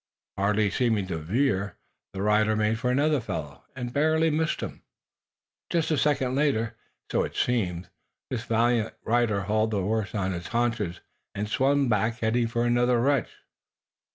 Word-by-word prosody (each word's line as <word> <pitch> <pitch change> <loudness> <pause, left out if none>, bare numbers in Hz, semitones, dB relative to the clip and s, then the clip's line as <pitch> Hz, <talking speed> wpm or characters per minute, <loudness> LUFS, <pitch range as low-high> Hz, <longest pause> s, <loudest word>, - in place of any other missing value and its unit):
Hardly 100 +1 +1
seeming 110 -4 +1
to 80 -3 -2
veer, 100 - 0 0.4
the 95 0 -3
rider 110 +1 +3
made 110 +1 +1
for 125 - 0
another 145 +2 +2
fellow, 75 -10 -6
and 120 -2 -5
barely 160 +2 +3
missed 155 +1 0
him. - - -6 0.9
Just 165 -2 0
a 155 - +2
second 135 -4 +1
later, 130 -6 +1 0.4
so - - +2
it - - -4
seemed, 95 -8 0 0.4
this 120 -2 -3
valiant 115 -1 +1
rider 115 -3 +1
hauled 110 +3 +1
the 105 -3 -1
horse 110 +2 -1
on 95 -2 -1
its 85 0 -5
haunches, 115 -7 -1 0.3
and 105 +1 -2
swung 135 +5 +2
back, 110 0 +1
heading 115 0 +1
for 120 +1 -1
another 120 0 +3
wretch. 135 0 +2
115 Hz, 155 wpm, -26 LUFS, 105-125 Hz, 0.9 s, rider